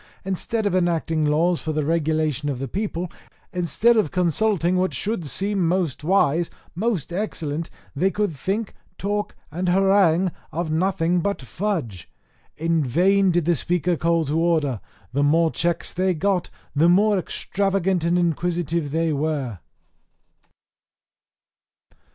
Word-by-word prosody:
Instead 205 Hz, +4 st, -1 dB
of 200 Hz, -, +1 dB
enacting 165 Hz, -3 st, +1 dB
laws 165 Hz, +4 st, +2 dB
for 155 Hz, -, -3 dB
the 155 Hz, -1 st, -1 dB
regulation 155 Hz, -2 st, 0 dB
of 135 Hz, -, -2 dB
the 135 Hz, +2 st, -4 dB
people, 180 Hz, -, -3 dB, 0.4 s
instead 185 Hz, +7 st, +3 dB
of 210 Hz, -8 st, +2 dB
consulting 180 Hz, +1 st, +1 dB
what 185 Hz, 0 st, 0 dB
should 205 Hz, -7 st, -2 dB
seem 195 Hz, +2 st, 0 dB
most 175 Hz, -6 st, -1 dB
wise, 170 Hz, -2 st, +2 dB, 0.2 s
most 185 Hz, -4 st, -2 dB
excellent, 165 Hz, -5 st, -3 dB, 0.3 s
they 185 Hz, +7 st, +2 dB
could 205 Hz, -5 st, -1 dB
think, 195 Hz, +9 st, -2 dB, 0.2 s
talk, 205 Hz, +1 st, -2 dB, 0.2 s
and 180 Hz, +3 st, -1 dB
harangue 190 Hz, -2 st, +3 dB, 0.2 s
of 165 Hz, -1 st, -2 dB
nothing 175 Hz, +1 st, +1 dB
but 200 Hz, +4 st, -1 dB
fudge. 135 Hz, -, -4 dB, 0.5 s
In 165 Hz, 0 st, +1 dB
vain 190 Hz, +9 st, +3 dB
did 175 Hz, -2 st, +1 dB
the 175 Hz, -, +3 dB
Speaker 175 Hz, +3 st, 0 dB
call 165 Hz, 0 st, +1 dB
to 150 Hz, +3 st, 0 dB
order; 155 Hz, -9 st, +1 dB, 0.3 s
the 140 Hz, -, +1 dB
more 160 Hz, +3 st, +3 dB
checks 170 Hz, 0 st, -1 dB
they 185 Hz, 0 st, +1 dB
got 185 Hz, +1 st, 0 dB, 0.3 s
the 160 Hz, +4 st, +4 dB
more 200 Hz, +2 st, +4 dB
extravagant 190 Hz, -1 st, -1 dB
and 170 Hz, +1 st, +2 dB
inquisitive 170 Hz, -2 st, 0 dB
they 160 Hz, +1 st, 0 dB
were. 140 Hz, -, -2 dB
170 Hz, 135 wpm, -23 LUFS, 155-190 Hz, 0.5 s, the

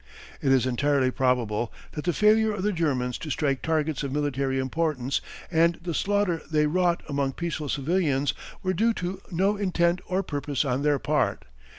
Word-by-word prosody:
It 135 Hz, -, +2 dB
is 130 Hz, -2 st, +4 dB
entirely 130 Hz, +1 st, +2 dB
probable 120 Hz, -4 st, 0 dB, 0.2 s
that 150 Hz, -, -6 dB
the 175 Hz, -, +3 dB
failure 215 Hz, +3 st, +4 dB
of 195 Hz, -2 st, -4 dB
the 210 Hz, -, +2 dB
Germans 130 Hz, -7 st, 0 dB
to 155 Hz, -, -6 dB
strike 135 Hz, -1 st, 0 dB
targets 155 Hz, -2 st, 0 dB
of 140 Hz, -2 st, -3 dB
military 140 Hz, -2 st, 0 dB
importance 135 Hz, -1 st, -1 dB, 0.3 s
and 170 Hz, 0 st, +4 dB
the 170 Hz, 0 st, -4 dB
slaughter 200 Hz, -2 st, +1 dB
they 150 Hz, -1 st, +3 dB
wrought 175 Hz, +2 st, +1 dB
among 140 Hz, -2 st, -1 dB
peaceful 155 Hz, -3 st, -3 dB
civilians 145 Hz, -1 st, +1 dB, 0.3 s
were 185 Hz, 0 st, +1 dB
due 225 Hz, +5 st, +2 dB
to 185 Hz, +2 st, -4 dB
no 195 Hz, +4 st, +1 dB
intent 180 Hz, -2 st, +1 dB
or 185 Hz, +1 st, 0 dB
purpose 145 Hz, -4 st, -2 dB
on 130 Hz, 0 st, 0 dB
their 145 Hz, 0 st, +3 dB
part. -, -, 0 dB
150 Hz, 175 wpm, -26 LUFS, 135-180 Hz, 0.3 s, is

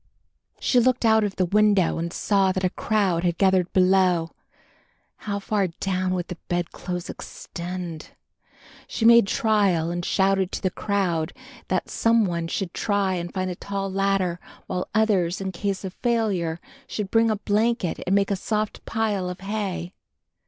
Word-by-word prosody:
She 250 Hz, -, +3 dB
looked 250 Hz, 0 st, +2 dB
out 220 Hz, -1 st, +5 dB
of 205 Hz, -2 st, -2 dB
the 185 Hz, -, +1 dB
window 200 Hz, -2 st, +3 dB
and 170 Hz, +1 st, -3 dB
saw 195 Hz, -1 st, +2 dB
that 185 Hz, 0 st, -2 dB
a 180 Hz, -, +2 dB
crowd 195 Hz, -6 st, 0 dB
had 175 Hz, -1 st, 0 dB
gathered 190 Hz, -2 st, +3 dB
below. 185 Hz, -3 st, +3 dB, 1.0 s
How 200 Hz, -1 st, -1 dB
far 200 Hz, -1 st, 0 dB
down 185 Hz, +1 st, -2 dB
would 175 Hz, -1 st, -3 dB
the 180 Hz, -, -7 dB
bedclothes 175 Hz, 0 st, -3 dB
extend? 175 Hz, -3 st, -7 dB, 0.8 s
She 225 Hz, -, -2 dB
made 235 Hz, -3 st, +7 dB
trial 200 Hz, -7 st, +2 dB
and 175 Hz, 0 st, -3 dB
shouted 190 Hz, 0 st, +1 dB
to -, -, -3 dB
the 185 Hz, -, +1 dB
crowd 180 Hz, -7 st, -1 dB, 0.3 s
that -, -, -1 dB
some 230 Hz, -1 st, +2 dB
one 170 Hz, -2 st, -2 dB
should 175 Hz, +1 st, -3 dB
try 200 Hz, -2 st, 0 dB
and 175 Hz, -1 st, -3 dB
find 185 Hz, -1 st, -2 dB
a -, -, -5 dB
tall 195 Hz, +1 st, -4 dB
ladder, 195 Hz, -2 st, 0 dB, 0.3 s
while 180 Hz, -, -3 dB
others, 195 Hz, -5 st, +2 dB
in 190 Hz, -1 st, -3 dB
case 195 Hz, +2 st, -3 dB
of 185 Hz, -, -5 dB
failure, 200 Hz, -9 st, 0 dB, 0.3 s
should 205 Hz, -3 st, -4 dB
bring 225 Hz, 0 st, +4 dB
a 215 Hz, -, +2 dB
blanket 210 Hz, -1 st, 0 dB
and 190 Hz, -, +3 dB
make 200 Hz, 0 st, +2 dB
a -, -, +2 dB
soft 215 Hz, +1 st, -2 dB
pile 210 Hz, -5 st, -1 dB
of 180 Hz, +1 st, -7 dB
hay. 195 Hz, -3 st, -3 dB
190 Hz, 165 wpm, -24 LUFS, 180-210 Hz, 1.0 s, made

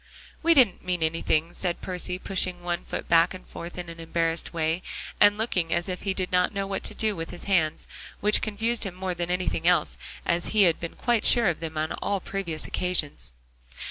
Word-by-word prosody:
"We 335 Hz, 0 st, +4 dB
didn't 245 Hz, -10 st, +4 dB
mean 180 Hz, -2 st, -1 dB
anything," 160 Hz, +1 st, +1 dB
said 175 Hz, -2 st, -2 dB
Percy, 180 Hz, 0 st, -2 dB
pushing 185 Hz, -2 st, -2 dB
one 175 Hz, -1 st, -2 dB
foot -, -, -5 dB
back 165 Hz, +2 st, +4 dB
and 185 Hz, -, -11 dB
forth 170 Hz, +1 st, -8 dB
in 175 Hz, -1 st, -5 dB
an 165 Hz, 0 st, -9 dB
embarrassed 165 Hz, 0 st, 0 dB
way, 165 Hz, +1 st, 0 dB, 0.4 s
and 205 Hz, 0 st, +6 dB
looking 185 Hz, -7 st, 0 dB
as 170 Hz, +2 st, +1 dB
if 180 Hz, -1 st, -4 dB
he 195 Hz, -2 st, -1 dB
did 185 Hz, -1 st, -2 dB
not 180 Hz, +2 st, +2 dB
know 195 Hz, 0 st, -1 dB
what 195 Hz, 0 st, -3 dB
to -, -, -3 dB
do 215 Hz, -2 st, 0 dB
with 165 Hz, 0 st, -5 dB
his 175 Hz, -, -9 dB
hands, 165 Hz, -6 st, +1 dB, 0.3 s
which 210 Hz, +1 st, +4 dB
confused 225 Hz, +2 st, 0 dB
him 195 Hz, -4 st, -4 dB
more 185 Hz, 0 st, -2 dB
than 175 Hz, 0 st, -3 dB
anything 180 Hz, -2 st, -1 dB
else, 180 Hz, 0 st, +3 dB, 0.3 s
as 170 Hz, 0 st, 0 dB
he 205 Hz, -, +8 dB
had 170 Hz, -3 st, +4 dB
been 170 Hz, -, -6 dB
quite 240 Hz, -3 st, +1 dB
sure 235 Hz, -5 st, +5 dB
of 170 Hz, -, -2 dB
them 160 Hz, -1 st, -5 dB
on 155 Hz, 0 st, -1 dB
all 200 Hz, -1 st, -1 dB
previous 180 Hz, -5 st, -3 dB
occasions. 145 Hz, -, -1 dB
180 Hz, 210 wpm, -26 LUFS, 165-195 Hz, 0.4 s, he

